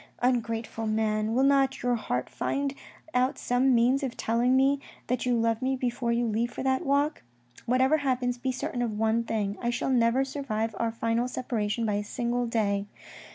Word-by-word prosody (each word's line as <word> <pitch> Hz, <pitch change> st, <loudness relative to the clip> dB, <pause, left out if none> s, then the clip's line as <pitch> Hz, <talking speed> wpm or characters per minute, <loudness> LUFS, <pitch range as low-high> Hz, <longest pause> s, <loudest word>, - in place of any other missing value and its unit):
" -, -, -30 dB
Ungrateful 230 Hz, -2 st, 0 dB
man, 215 Hz, 0 st, 0 dB
will 260 Hz, -, +3 dB
not 275 Hz, -2 st, +3 dB
your 245 Hz, 0 st, +2 dB
heart 130 Hz, -, -2 dB
find 280 Hz, 0 st, -2 dB, 0.4 s
out 255 Hz, +1 st, +2 dB
some 250 Hz, +1 st, +2 dB
means 250 Hz, +4 st, +3 dB
of 265 Hz, -4 st, -4 dB
telling 240 Hz, +3 st, +2 dB
me 275 Hz, +1 st, +3 dB, 0.3 s
that 250 Hz, 0 st, -1 dB
you 245 Hz, -, +3 dB
love 230 Hz, 0 st, +1 dB
me 265 Hz, +1 st, +1 dB
before 245 Hz, -2 st, -1 dB
you 235 Hz, +1 st, +1 dB
leave 230 Hz, +2 st, 0 dB
for -, -, -5 dB
that 265 Hz, 0 st, +1 dB
walk. 285 Hz, +2 st, +1 dB, 0.5 s
Whatever 260 Hz, +5 st, +3 dB
happens, 250 Hz, -3 st, -1 dB
be 260 Hz, +1 st, -1 dB
certain 250 Hz, -1 st, -3 dB
of 225 Hz, -3 st, -2 dB
one 225 Hz, +1 st, +2 dB
thing: 210 Hz, -3 st, -2 dB
I 240 Hz, -, 0 dB
shall 240 Hz, +2 st, -1 dB
never 245 Hz, +2 st, +3 dB
survive 230 Hz, -6 st, -3 dB
our 230 Hz, -1 st, 0 dB
final 230 Hz, +1 st, 0 dB
separation 230 Hz, -3 st, -2 dB
by 210 Hz, -, 0 dB
a -, -, -6 dB
single 240 Hz, +2 st, -2 dB
day. 205 Hz, -3 st, 0 dB
240 Hz, 190 wpm, -28 LUFS, 225-260 Hz, 0.5 s, will